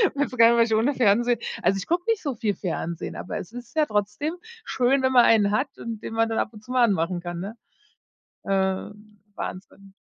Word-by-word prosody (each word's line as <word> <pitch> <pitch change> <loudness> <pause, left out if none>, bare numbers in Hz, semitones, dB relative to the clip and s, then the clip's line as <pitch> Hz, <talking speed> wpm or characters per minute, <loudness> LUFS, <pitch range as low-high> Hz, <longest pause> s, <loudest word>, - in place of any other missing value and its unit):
weiß 285 0 0
gar 230 0 +8
nicht 235 - +4
mehr - - +1
was 230 -1 +3
ich - - +4
ohne 235 +7 +2
Fernsehen 240 0 +3 0.2
also, 195 - +2
ich 195 - -6
gucke 345 +1 +1
nicht 455 -2 +1
so 280 -5 -2
viel 210 -2 -1
Fernsehen, 170 -2 -4
aber - - -5
es 185 - -7
ist 240 +1 -10
ja 310 -1 +3
trotzdem 210 +7 -1 0.3
schön, 265 +2 +2
wenn 260 0 +2
man 245 -2 +7
einen 210 -3 +4
hat 265 +6 -1
und 225 -2 -6
den - - -6
man 225 0 +1
dann 225 - -2
ab - - 0
und 210 -1 -13
zu 250 - -10
mal 255 -1 +4
anmachen 180 -5 +1
kann, 175 -1 -5
ne? 200 +6 -6 0.9
Äh, 190 +1 -1 0.4
Wahnsinn, 195 +1 -8
225 Hz, 225 wpm, -25 LUFS, 195-250 Hz, 0.9 s, gar